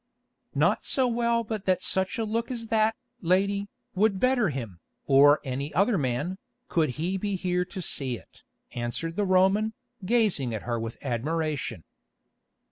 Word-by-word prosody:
"Not - - +2
so 260 -2 +2
well 235 -1 +1
but 215 -2 -5
that 185 -1 +1
such 190 0 0
a 225 - 0
look 230 +2 -2
as 230 -3 -5
that, 220 0 +3 0.3
lady, 200 +3 +1 0.3
would 200 0 +2
better 255 -5 +3
him, 115 - -5 0.3
or 145 +2 +6
any 140 +2 -3
other 200 +6 +3
man, 150 +5 -1 0.3
could 160 -4 +2
he 180 +5 -1
be 205 0 -1
here 180 -1 0
to 185 0 -6
see 130 -6 0
it," - - -19 0.3
answered 120 +8 -3
the 205 - +1
Roman, 190 +4 +3 0.3
gazing 185 - +1
at 105 - -5
her 120 -1 -2
with 115 0 -5
admiration. 145 - -2
185 Hz, 155 wpm, -27 LUFS, 140-215 Hz, 0.3 s, or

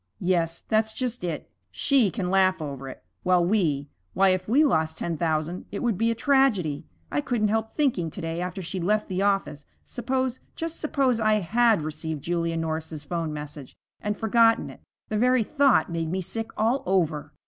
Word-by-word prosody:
'Yes, 170 -2 0
that's 220 0 +1
just 245 -5 -3
it. 165 -4 -3 0.2
She 225 - +2
can 185 -3 -3
laugh 190 -1 +3
over 140 -3 -6
it, - - -11 0.2
while 180 -1 +3
we 165 -8 +1 0.3
why, 195 +1 +5
if 185 +1 0
we 285 +7 +5
lost 160 - +1
ten 170 - -2
thousand 160 +2 -1
it 200 - -5
would 235 -4 +1
be 225 +5 +1
a 230 - 0
tragedy. 225 - +2 0.2
I 145 - +1
couldn't 215 +3 0
help 220 +1 -1
thinking 245 - +1
to - - -9
day 165 +1 -3
after 180 +1 -4
she'd 180 +1 -4
left 210 +4 +1
the 185 0 -1
office, 195 -7 0 0.2
suppose, 260 +1 -2 0.2
just 330 0 -4
suppose, 270 -6 +1
I 215 -1 +3
had 215 0 +3
received 155 -1 -4
Julia 170 -1 -1
Norris's 160 -1 -4
'phone 165 +1 -3
message 150 -2 -8 0.3
and 210 0 -2
forgotten 225 +1 +3
it. - - -14 0.3
The 215 - -1
very 250 0 +4
thought 280 - +3
made 165 -1 -2
me 190 +3 -1
sick 225 +5 -4
all 230 +5 +2
over.' 165 -6 0
185 Hz, 185 wpm, -26 LUFS, 165-225 Hz, 0.3 s, why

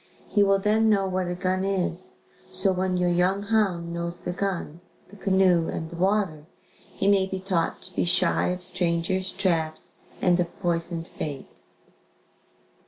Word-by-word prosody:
He 205 - +3
will 195 -1 +5
then 215 +3 +3
know 200 -2 +3
what 185 -1 -1
a 175 - -2
gun 185 +1 0
is. 185 -2 -2 0.3
So 190 +1 +3
when 185 0 0
your 180 0 +2
young 185 +3 +2
hound 195 -6 +1
knows 170 0 -3
the 180 - -4
gun, 175 -3 -3 0.3
the 205 - -14
canoe 190 -4 +3
and 160 +1 -4
water, 180 -4 0 0.5
he - - 0
may 195 -1 +4
be 190 0 -4
taught 185 -3 -1
to 185 -1 -10
be - - 0
shy 170 - +3
of 180 0 -2
strangers, 180 +2 0
traps 160 -4 -2 0.2
and 180 0 +3
of 175 -1 -2
poisoned 170 -1 -2
baits. 145 -3 -5
185 Hz, 160 wpm, -26 LUFS, 170-195 Hz, 0.5 s, will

